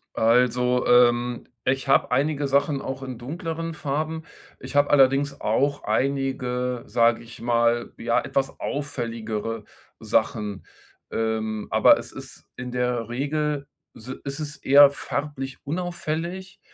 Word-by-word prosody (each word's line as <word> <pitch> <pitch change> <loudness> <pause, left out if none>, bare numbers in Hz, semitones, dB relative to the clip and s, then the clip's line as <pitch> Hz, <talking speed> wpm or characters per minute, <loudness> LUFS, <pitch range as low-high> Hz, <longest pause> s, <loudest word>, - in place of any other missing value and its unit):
Also, 125 +2 +3
ähm, 120 0 +3 0.2
ich 135 +1 0
habe 135 - +3
einige 145 0 +1
Sachen 140 0 +1
auch 135 0 -5
in 130 -3 -6
dunkleren 165 +5 -5
Farben. 155 +2 -3 0.4
Ich - - -9
habe 145 0 +4
allerdings 140 0 +3
auch 140 +6 0
einige, 125 0 -1
sage 115 0 +2
ich 115 +1 -12
mal, 120 0 +1
ja, 120 +1 +1
etwas 135 -1 -2
auffälligere 115 -6 -4 0.4
Sachen. 105 -2 -1 0.4
Ähm, 110 -1 -2
aber - - +6
es - - -8
ist - - -10
in 125 0 -6
der 125 -2 -1
Regel 145 +2 -2 0.3
si 120 +3 -8
ist 140 +2 -5
es 150 -1 -5
eher 140 +1 +7
farblich 140 -2 -4
unauffällig, 175 +3 -4
130 Hz, 125 wpm, -24 LUFS, 120-145 Hz, 0.4 s, eher